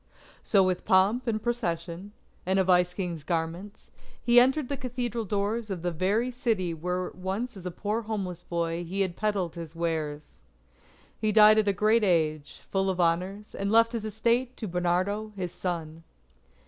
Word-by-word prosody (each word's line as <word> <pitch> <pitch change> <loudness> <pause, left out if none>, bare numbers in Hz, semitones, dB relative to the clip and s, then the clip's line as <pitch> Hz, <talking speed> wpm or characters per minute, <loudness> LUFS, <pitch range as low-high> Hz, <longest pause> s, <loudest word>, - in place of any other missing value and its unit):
So 195 -3 +3
with 185 -1 0
pomp 210 +5 +3
and 220 -2 0
procession, 190 -5 -3 0.4
in 190 +1 +2
a 190 - +4
Vice 180 -1 +3
King's 175 -4 -4
garments, 170 +6 -4 0.3
he 240 0 +6
entered 265 +3 +3
the 280 - -2
Cathedral 245 -4 -3
doors 210 +3 -1
of 180 -4 -4
the 175 - 0
very 200 +9 0
city 220 -8 -1
where 180 +3 -3
once 195 +7 -4
as 185 -2 -7
a - - -1
poor 210 +5 -2
homeless 195 -6 -4
boy 170 0 -2
he 190 +4 -2
had 185 -3 -1
peddled 200 -6 -1
his 165 -1 -8
wares. 155 -3 -3 0.8
He 215 -1 +1
died 215 0 +7
at 215 - +1
a - - +5
great 215 +4 +3
age, 155 -5 0
full 195 0 +1
of 185 -1 -2
honours, 180 +5 0
and 200 +1 -2
left 230 +1 +5
his 230 -3 -3
estate 235 +4 0
to 220 - -5
Bernardo 185 +5 -1
his 180 -3 -4
son. 165 -3 -4
195 Hz, 175 wpm, -27 LUFS, 175-220 Hz, 0.8 s, died